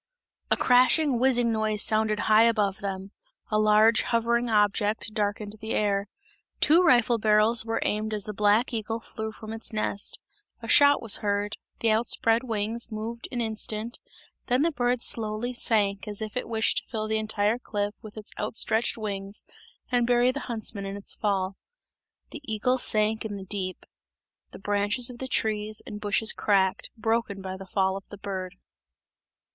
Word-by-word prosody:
A - - +2
crashing, 255 +2 +4
whizzing 245 -2 +3
noise 215 -1 +1
sounded 215 -1 +1
high 220 +1 +5
above 210 -3 +1
them; 195 -1 -5 0.4
a 215 - +2
large 215 +1 +5
hovering 235 +1 0
object 210 0 +1
darkened 210 0 -2
the 220 +1 -3
air. 200 -1 0 0.5
Two 325 +4 +5
rifle 240 -8 +4
barrels 215 +2 +4
were 225 0 -1
aimed 215 +1 -1
as 210 -2 -2
the 210 - -4
black 210 +4 +2
eagle 225 0 -2
flew 220 -1 -6
from 220 0 -9
its 225 - -5
nest; 215 -2 -2 0.4
a 230 - -9
shot 285 +2 +5
was 225 - +4
heard, 205 0 -2 0.2
the 225 - +3
out 225 +2 +1
spread 225 +1 +3
wings 225 0 -2
moved 225 +2 -5
an 245 - -2
instant, 220 0 -4 0.5
then 250 +3 +2
the 335 - +2
bird 245 -3 0
slowly 220 +2 -1
sank 205 -5 0
as 205 -1 -4
if 215 0 -5
it 250 - -3
wished 225 -1 +1
to - - -21
fill 215 -2 -3
the 220 0 0
entire 215 +1 0
cliff 205 -3 -3
with 215 0 -12
its 215 - -8
outstretched 220 +2 0
wings 200 -2 -4 0.5
and 245 -1 +2
bury 245 +1 +4
the 285 - -5
huntsmen 220 -3 -2
in 195 +1 -5
its 200 - -1
fall. 195 -2 -1 0.7
The 305 - -8
eagle 250 +4 +1
sank 215 0 +1
in 215 -2 -5
the 190 - -8
deep; 190 -2 -3 0.6
the - - -11
branches 205 +5 0
of 240 - -12
the 260 - -4
trees 215 -3 -1
and 210 -2 -8
bushes 210 +1 +1
cracked, 190 -2 +1
broken 225 -2 -1
by 190 -1 -6
the 190 0 -10
fall 190 0 +1
of 195 - -8
the 205 - -9
bird. 190 -2 -5
215 Hz, 175 wpm, -26 LUFS, 205-230 Hz, 0.7 s, high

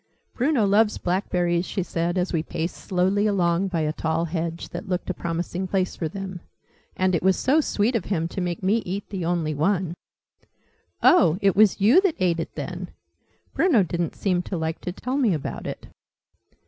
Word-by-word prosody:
"Bruno 255 -3 +2
loves 210 +2 +3
blackberries," 175 -2 0
she 190 - -2
said, 170 +1 -2
as 180 +1 -1
we 165 - +1
paced 165 +1 -4
slowly 190 +3 +1
along 180 -2 +1
by 175 -4 -1
a 155 0 0
tall 160 +1 -1
hedge, 165 0 -4
"that 200 - -7
looked 180 0 -1
a - - -2
promising 175 +2 -3
place 185 -1 0
for 160 - -3
them, 190 -1 -6 0.6
and 185 0 +2
it 170 - +1
was 190 +1 +3
so 290 +5 +3
sweet 235 -3 0
of 220 - -1
him 165 -5 -1
to 185 - -4
make 175 0 -3
me 200 +4 +3
eat 200 -2 -4
the 190 -3 -3
only 165 -2 0
one!" 170 +3 0 1.1
"Oh, 245 - +6
it 200 -2 +2
was 210 0 +5
you 240 - +6
that 385 -5 +1
ate 170 -2 +1
it, 165 - -5
then? 175 +5 -5 0.6
Bruno 270 - +4
didn't 170 -2 -2
seem 185 -3 0
to 180 0 -4
like 160 0 -3
to 180 - -4
tell 255 +8 -3
me 230 -10 +3
about 145 - -5
it." - - -6
180 Hz, 190 wpm, -24 LUFS, 170-200 Hz, 1.1 s, Oh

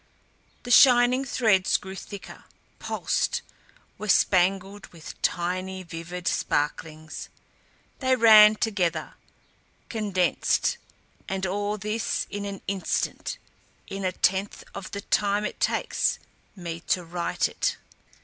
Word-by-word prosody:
The 245 - -5
shining 250 0 +6
threads 215 -8 +2
grew 190 -1 -9
thicker, 200 +1 -10 0.3
pulsed, - - -1 0.6
were 215 - -5
spangled 195 +2 +2
with 165 -2 -12
tiny 185 +2 -2
vivid 175 +1 -7
sparklings. 155 +1 -2 0.7
They 260 -1 +2
ran 215 -3 +8
together, 200 -6 -1 0.8
condensed 200 -6 0 0.5
and 190 0 -2
all 205 +3 -2
this 210 +1 -2
in 205 0 -4
an 200 -1 -6
instant, 195 - -2 0.5
in 195 0 -6
a 185 - +1
tenth 190 +2 0
of 200 -1 -7
the 200 - -5
time 205 +1 +1
it - - -5
takes - - 0 0.4
me 170 -3 -6
to 180 - +1
write 170 +1 -1
it. - - -2
195 Hz, 110 wpm, -26 LUFS, 180-210 Hz, 0.8 s, ran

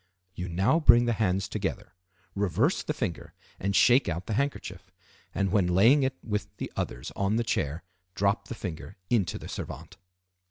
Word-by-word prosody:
You 90 -1 -5
now 95 - +2
bring 120 -6 +6
the 120 - +1
hands 95 -2 0
together, - - -4 0.4
reverse 100 - +1
the - - -3
finger, 100 - -4 0.3
and 100 +1 -1
shake 125 -2 +5
out 85 +2 -3
the 110 - -3
handkerchief; 140 +5 -3 0.5
and, 95 -1 0
when 95 -3 +3
laying 110 +11 +5
it 130 0 0
with 105 -2 -2
the - - -5
others 60 - -4
on 100 +2 0
the 120 - +1
chair, 80 -7 -2 0.3
drop 100 +2 0
the 120 - -6
finger 95 0 -7
into 105 -8 +1
the - - -9
servante. - - -7
100 Hz, 170 wpm, -28 LUFS, 90-120 Hz, 0.5 s, bring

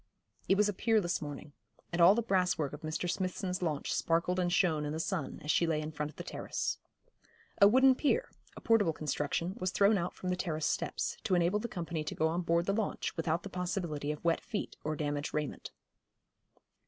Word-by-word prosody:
It 195 - +5
was 210 0 +4
a 205 - 0
peerless 210 -3 +1
morning, 145 0 -7 0.4
and 175 - +1
all 180 +4 +8
the 235 - 0
brasswork 180 -8 +1
of 145 - -8
Mr. 155 +3 -3
Smithson's 185 0 -2
launch 155 -5 -1
sparkled 170 +2 +1
and 175 -1 +1
shone 165 -5 +2
in 150 0 -3
the 160 - -3
sun, 165 -5 -3
as 150 - +1
she 170 - +3
lay 160 -2 +1
in 155 0 -4
front 150 -1 -3
of 155 - -15
the - - -7
terrace. - - -3 0.8
A 200 - +10
wooden 260 +4 +6
pier, 320 - 0 0.3
a - - -8
portable 210 -8 +3
construction, 155 +3 -2
was 185 - 0
thrown 200 +2 +4
out 175 +1 -3
from 185 - -4
the 180 - +1
terrace 160 -4 -2
steps, - - -1
to 190 - +2
enable 175 +4 +2
the 235 - -3
company 170 -6 -4
to - - -4
go 160 - +2
on 170 +2 -1
board 170 0 +1
the 195 - +1
launch 215 0 -2
without 165 0 -1
the 200 - -6
possibility 175 -6 -2
of 150 +2 -7
wet 165 -1 +2
feet 210 - -4
or 155 +1 -1
damaged 145 -1 -2
raiment. 150 -1 -3
175 Hz, 210 wpm, -32 LUFS, 155-195 Hz, 0.8 s, A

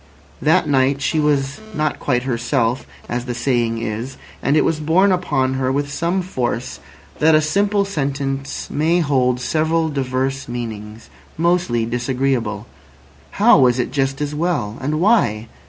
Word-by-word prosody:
That - - +3
night 135 0 +2
she 150 +3 0
was 140 -2 0 0.2
"not 155 0 -1
quite 125 -3 0
herself," 120 0 -1 0.2
as 120 0 -3
the 120 -1 -4
saying 120 -2 0
is, 115 +5 -4 0.2
and 145 +3 +2
it - - +3
was 160 - 0
borne 175 +6 +3
upon 145 -8 0
her 130 -1 0
with 140 +1 -1
some 175 +4 0
force 125 -7 -3 0.4
that 160 +1 +5
a - - +6
simple 200 +6 +1
sentence 140 -6 -3
may 165 +4 +2
hold 130 -5 +1
several 160 +4 0
diverse 135 -1 -2
meanings—mostly 115 - -3
disagreeable. 120 -3 -1 0.7
How - - +5
was 125 -1 +4
it 125 - -1
just 135 0 -1
as 145 0 -2
well? 150 -10 -1
And 150 +3 -1
why? 140 - +2
135 Hz, 145 wpm, -19 LUFS, 120-155 Hz, 0.7 s, a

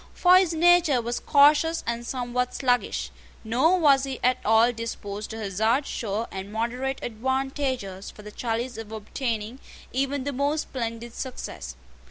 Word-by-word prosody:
For 360 0 +6
his 370 -3 +3
nature 340 -4 +5
was 235 +1 -2
cautious 300 +3 +4
and 235 0 -2
somewhat 250 -1 -2
sluggish; 245 -2 0 0.3
nor 260 +11 +3
was 280 -5 +5
he 270 -2 -4
at 255 0 +3
all 225 +2 +5
disposed 215 -2 -5
to 225 - -6
hazard 220 +6 +1
sure 220 -2 -3
and 190 +1 -6
moderate 250 +4 -2
advantages 260 -4 -2
for 210 - -13
the 210 - -9
chalice 235 +1 -3
of 225 -1 -8
obtaining 220 +2 -4 0.3
even 270 +1 -1
the 285 +1 -3
most 285 +4 0
splendid 230 -2 -5
success. 155 - -6
245 Hz, 150 wpm, -26 LUFS, 225-275 Hz, 0.3 s, For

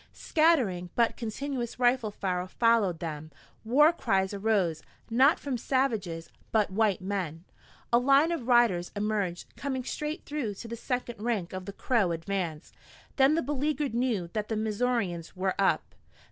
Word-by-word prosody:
Scattering 250 - +2
but 235 -1 +2
continuous 240 +1 -4
rifle 245 -2 +3
fire 185 -3 -2
followed 220 -4 +2
them, 155 -2 -6 0.3
war 295 +8 +5
cries 190 - 0
arose, 195 -6 +1 0.3
not 265 +6 +5
from 265 -4 -3
savages, 220 -12 -1 0.2
but 215 -3 +2
white 205 -2 +1
men. 185 -4 -3 0.5
A 235 - +7
line 275 +6 +4
of 295 -8 -3
riders 235 -8 +4
emerged, 205 -4 -2
coming 265 -2 -3
straight 300 +6 -4
through 270 -9 -3
to 230 - -9
the 235 - -5
second 240 -2 -4
rank 215 -7 -2
of 185 0 -5
the 200 - -7
Crow 215 -6 +1
advance. 165 -2 -4 0.4
Then 275 +2 +5
the 330 - 0
beleaguered 290 0 -1
knew 235 -7 0
that 215 -1 -2
the 220 - -2
Missourians 215 -6 -1
were 185 0 0
up. 195 - +1
220 Hz, 150 wpm, -28 LUFS, 185-255 Hz, 0.5 s, A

